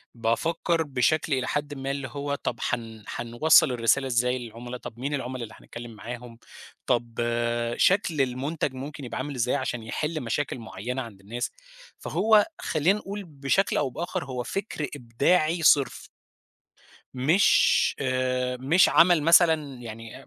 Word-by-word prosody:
بافكر 160 +8 0
بشكل 145 +2 +1
إلى 130 -1 0
حدٍ 145 0 -2
ما 135 -1 -4
اللي 140 -1 -4
هو 140 +1 -3
طَب 120 -4 -4
هن 110 -2 -4
هنوصَّل 130 +5 +3
الرسالة 125 +3 +2
إزاي 125 0 +1
للعملا، 120 +1 -8
طب 120 -1 -10
مين 140 +3 -3
العملا 130 -3 -3
اللي 110 - -9
هنتكلم 120 0 -10
معاهم، 120 +1 -9 0.5
طَب 120 -1 0 0.6
شكل 175 -6 +3
المُنتَج 135 +3 -2
ممكن 140 +1 -7
يبقى - - -5
عامل 145 +1 -4
إزاي 125 +2 0
علشان 120 -4 -3
يحِل 155 +7 -3
مشاكل 125 +2 -2
معيّنة 115 +4 -5
عند 115 -5 -10
الناس، 115 +5 -4 0.5
فهو 215 -1 +3 0.2
خلّينا 175 +7 +1
نقول 200 +1 -6
بشكل 150 +3 0
أو - - +1
بآخر 165 +2 -4
هو 125 -2 -4
فِكر 195 - -4
إبداعي 155 +7 +1
صِرف. 145 -3 +3 1.1
مش 155 +10 +4
آآ 130 -1 0
مش 160 +8 +4
عَمَل 170 -3 +5
مثلًا 160 -3 +4
يعني 115 +3 -9
130 Hz, 140 wpm, -26 LUFS, 120-155 Hz, 1.1 s, عَمَل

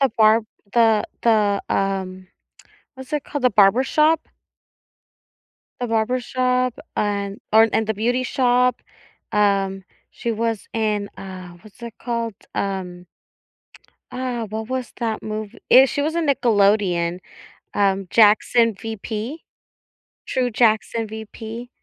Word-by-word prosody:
The 270 - +4
Barb 220 0 +4 0.3
the 225 -3 +4 0.2
the, 210 -3 +2
um, 190 -1 -2 0.7
what's 265 +2 -11
it 295 -2 -1
called, 290 -4 -5
The 250 - +5
Barbershop? 265 +10 +3 1.5
The 245 - -2
Barbershop 250 +2 0 0.2
and 200 -1 -2
or, 225 +1 +6
and 220 - +1
The 220 - -1
Beauty 245 +5 0
Shop, 250 -1 +2 0.5
um 195 -2 +1 0.3
she 235 - -3
was 225 -1 -2
in, 215 -3 -1
uh, 185 -2 -9
what's 215 +2 -17
it 235 -2 -7
called? 230 -2 -3 0.2
Um 180 -2 -4 1.1
Uh, 250 -2 -3
what 220 +2 -5
was 255 -1 -4
that 225 -2 -2
movie? 215 +1 -6
Eh, 260 +2 +8
she 285 +2 -2
was 315 +2 -1
a - - +2
Nickelodeon, 200 - +2 0.5
um, 195 -2 +1
Jackson 225 +1 +4
VP. 225 - -6 0.8
True 250 -1 0
Jackson 225 0 +1
VP. 220 +2 -8
220 Hz, 120 wpm, -21 LUFS, 200-245 Hz, 1.5 s, Eh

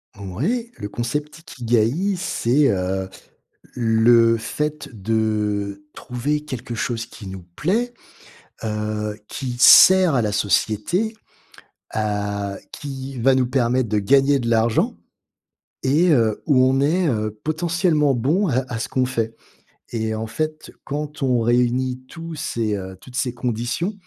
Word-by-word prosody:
Ouais, 160 - -3
le 105 -2 -6
concept 145 +8 -4
ikigaï, 125 - 0
c'est, 140 -6 +2
heu, 95 -1 -1 0.7
le 115 0 +4
fait 150 +6 -3
de 105 -2 -1
trouver 140 +5 -3
quelque 130 -4 -6
chose 115 0 -2
qui 105 - -11
nous 95 -1 -8
plaît, 230 +9 0 0.7
heu, 105 -1 -3
qui 125 -3 -5
sert 185 +3 +8
à 125 - +3
la 105 -2 0
société, 110 - 0 0.8
heu, 100 -2 -2 0.2
qui 135 -2 -7
va 135 +3 +4
nous 130 -1 +2
permettre 125 -1 +1
de 105 0 +1
gagner 135 +6 +4
de 115 -2 -2
l'argent 115 0 +2 0.9
et 155 +7 +3
heu, 115 -7 +2
où 130 -4 +4
on 130 +1 +3
est, 165 +5 +2
heu, 110 -2 -2
potentiellement 160 -2 +1
bon 150 - +1
à 130 -5 +2
à 115 - -2
ce - - -3
qu'on 130 -1 +1
fait 115 -3 -2 0.6
et 110 -1 -1
en 110 +1 -4
fait, 155 +6 -4
quand 150 +1 -5
on 125 -2 +2
réunit 125 +2 +1
tous 165 -1 -8
ces, 115 -7 -2
heu, 95 -1 -7
toutes 125 +5 -13
ces 135 -2 -1
conditions, 120 - -2
125 Hz, 135 wpm, -22 LUFS, 110-150 Hz, 0.9 s, sert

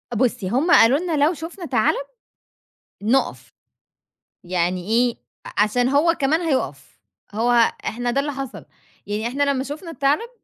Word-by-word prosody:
بُصّي، 215 -6 0
هم 285 - +1
قالوا 260 +3 +6
لنا 320 -5 +1
لو 330 - +2
شُفنا 335 +3 -8
تَعلَب، 280 - +1 1.0
نُقف، 260 +5 0 0.9
يعني 180 +1 -1
إيه؟ 235 +2 +2 0.3
أ - - -6
عشان 245 +4 +1
هو 300 +5 +3
كمان 305 +5 +2
هيُقف، 205 - -3 0.3
هو 230 +3 +1 0.3
إحنا 245 +1 -2
ده 275 +3 +1
اللي 290 +1 -3
حصل. 275 -1 -7 0.4
يعني 210 +2 -3
إحنا 280 +3 -2
لمّا 275 -2 +1
شُفنا 310 +5 -7
التَعلَب، 290 - 0
270 Hz, 145 wpm, -22 LUFS, 225-300 Hz, 1.0 s, قالوا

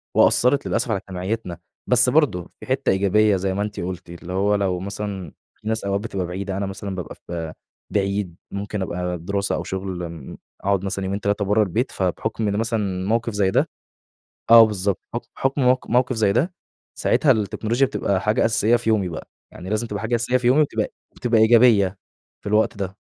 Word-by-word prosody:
وأثّرت 125 +3 +4
للأسف 115 0 0
على 100 - +1
اجتماعيتنا، 95 0 -4 0.3
بس 125 0 +4
برضه 125 - +2
في - - -10
حتّة 130 +1 0
إيجابية 100 +2 +3
زي 95 0 -1
ما 100 - -2
أنتِ 105 0 -4
قُلتِ، 90 0 -5
اللي 85 +1 -8
هو 100 +2 +2
لو 95 -3 0
مثلًا 100 -3 -5 0.2
في - - -12
ناس 110 0 -1
أوقات 100 0 0
بتبقى 100 -4 -3
بعيدة، 95 +2 -4
أنا 100 - -1
مثلًا 95 0 -5
بابقى 90 -4 -6
في 80 -2 -6 0.4
بعيد، 100 -3 -1 0.2
ممكن 100 +1 -4
أبقى 90 -1 -2
دِراسة 100 +4 -2
أو - - -3
شُغل 95 -3 -4
م 80 -5 -9 0.2
أقعُد 100 -1 +1
مثلًا 95 0 -2
يومين 100 +1 -2
3 100 0 0
برّه 105 +2 +3
البيت، 110 +7 -1
فبحُكم 105 +4 -2
إن 100 0 0
مثلًا 105 -5 -1
موقِف 115 +1 0
زي 100 -2 +2
ده - - +2 0.8
آه 115 -1 +10
بالضبط. 100 -2 -1
حُكم 120 - -4
حُكم 135 +1 0
موق 125 0 +3
موقِف 125 +1 +2
زي 105 -3 +3
ده، 170 - 0 0.4
ساعتها 145 - +3
التكنولوجيا 110 +4 0
بتبقى 100 -7 -1
حاجة 105 +2 +1
أساسية 110 +1 +3
في 120 -1 -1
يومي 100 -4 +2
بقى. 80 - -7 0.2
يعني 90 +3 -8
لازم 110 +2 0
تبقى 105 -2 -4
حاجة 115 +2 -1
أساسية 120 +2 +1
في 125 -1 -1
يومي 130 +5 +5
وتبقى 150 - 0 0.2
بتبقى 115 -2 +2
إيجابية 110 -4 +5 0.4
في - - -5
الوقت 105 +1 +2
ده. 100 -1 -4
100 Hz, 190 wpm, -22 LUFS, 95-115 Hz, 0.8 s, آه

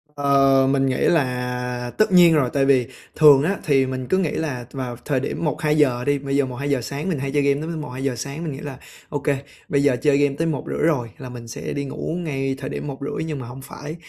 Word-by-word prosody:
Ờ, 135 -1 +4
mình 135 -1 +2
nghĩ 130 -1 0
là 125 -4 -1
tất 215 - +3
nhiên 175 -2 +7
rồi. 140 -6 +3
Tại 140 -1 +2
vì 130 -3 +3 0.3
thường 145 -3 +7
á 195 +4 0
thì 135 -3 +3
mình 130 -1 -4
cứ 185 - +2
nghĩ 180 -5 +1
là 130 -6 -3
vào 130 -3 -4
thời 140 -3 +1
điểm 135 - -3
1:00-2:00 150 -5 +2
đi 145 0 +1
bây 140 0 -3
giờ 140 -1 +3
1:00-2:00 135 +1 -2
sáng 140 +9 -4
mình 160 -6 -1
hay 135 0 -3
chơi 145 - +2
game 140 0 +2
tới 160 - -4
m 160 -2 -4
một, - - -7
2:00 130 0 -2
sáng, 140 +6 -5
mình 155 - -3
nghĩ 135 - -8
là 145 -4 -7 0.3
"Ô 145 - -2
kê, 140 -1 0 0.3
bây 140 -1 +2
giờ 140 -3 +4
chơi 145 -2 +4
game 145 -1 +2
đến 165 0 +1
1:30 145 - -4
rồi, 125 -8 0
là 130 - -8
mình 120 -1 -9
sẽ 115 - -5
đi 140 0 -3
ngủ 150 +4 -4
ngay 135 -4 -2
thời 135 0 -6
điểm 145 - -5
1:30." 140 +2 -4
Nhưng 155 -3 -4
mà 125 - -7
hông 130 +3 -9
phải, 150 +3 -8
140 Hz, 250 wpm, -22 LUFS, 130-150 Hz, 0.3 s, nhiên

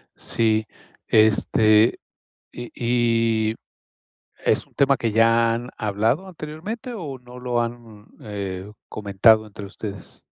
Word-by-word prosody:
Sí, 110 -1 0 0.4
este, 110 0 +4 0.5
y 120 -1 -8 0.8
y, 110 - -7 0.8
¿es - - 0
un - - -30
tema 140 0 +3
que 115 -3 -2
ya 115 +1 +4
han 120 +2 -4
hablado 110 - 0
anteriormente, 185 +9 -7
o 150 - -6
no 125 0 -13
lo 125 -1 -1
han, 115 -3 -6
eh, 100 -2 -6 0.2
comentado 110 +2 +3
entre 100 -1 -9
ustedes? 100 0 -9
115 Hz, 115 wpm, -23 LUFS, 105-125 Hz, 0.8 s, este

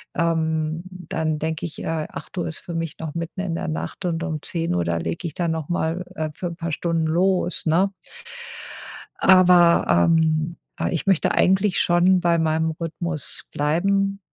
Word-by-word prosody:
Ähm, 160 -1 0
dann 160 -4 -3
denke 160 +1 -2
ich, 165 - -7
äh: - - -4 0.2
„8:00 175 -3 -5
ist 160 - -3
für 170 - -8
mich 165 -2 -4
noch 160 -1 -6
mitten 170 +3 -5
in 175 -4 -2
der - - -3
Nacht 155 +4 -5
und 165 -1 -1
um 160 -4 -3
10:00, 165 - -1
da 85 0 -1
lege 85 - -4
ich 150 - -7
dann 170 -2 -1
noch 160 -2 -4
mal, 175 +1 -1
äh, 155 0 -2
für 180 - -4
'n 170 - -6
paar 170 -1 -3
Stunden 165 0 0
los“, 180 +2 +1
ne? 185 +5 +2 1.3
Aber, 180 -2 +6 0.2
ähm, 160 0 +2 0.2
ah, - - -1
ich 170 0 -2
möchte 190 -5 +3
eigentlich 190 +1 +3
schon 175 +2 +4
bei 170 -1 +3
meinem 160 0 +1
Rhythmus 165 0 -5
bleiben, 195 +6 +1
165 Hz, 170 wpm, -23 LUFS, 160-180 Hz, 1.3 s, Aber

